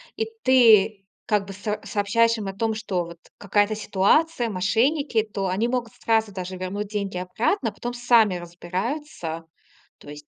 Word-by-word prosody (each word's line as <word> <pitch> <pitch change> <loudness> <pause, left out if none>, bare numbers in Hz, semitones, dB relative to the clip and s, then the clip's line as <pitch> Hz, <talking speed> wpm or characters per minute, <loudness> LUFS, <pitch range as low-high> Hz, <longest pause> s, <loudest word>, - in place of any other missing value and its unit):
и 445 - -1 0.2
ты 220 -6 +5 0.2
как 205 -2 +1
бы 195 - -8
с 200 - -14 0.2
сообщаешь 230 +3 +2
им 205 -2 -5
о 195 - -4
том, 225 +1 0
что 190 -5 -2
вот 170 0 -11 0.2
какая-то 205 +1 +1
ситуация, 230 +7 +2
мошенники, 225 - +1
то 200 -3 -4
они 200 +6 0
могут 240 -2 -2
сразу 220 -2 +1
даже 185 -1 -6
вернуть 195 +3 -4
деньги 200 -3 -3
обратно, 220 - -1
потом 240 0 -5
сами 235 -5 +4
разбираются. 175 - -5 0.5
То - - -14
есть 150 0 -11
210 Hz, 160 wpm, -24 LUFS, 185-230 Hz, 0.5 s, ты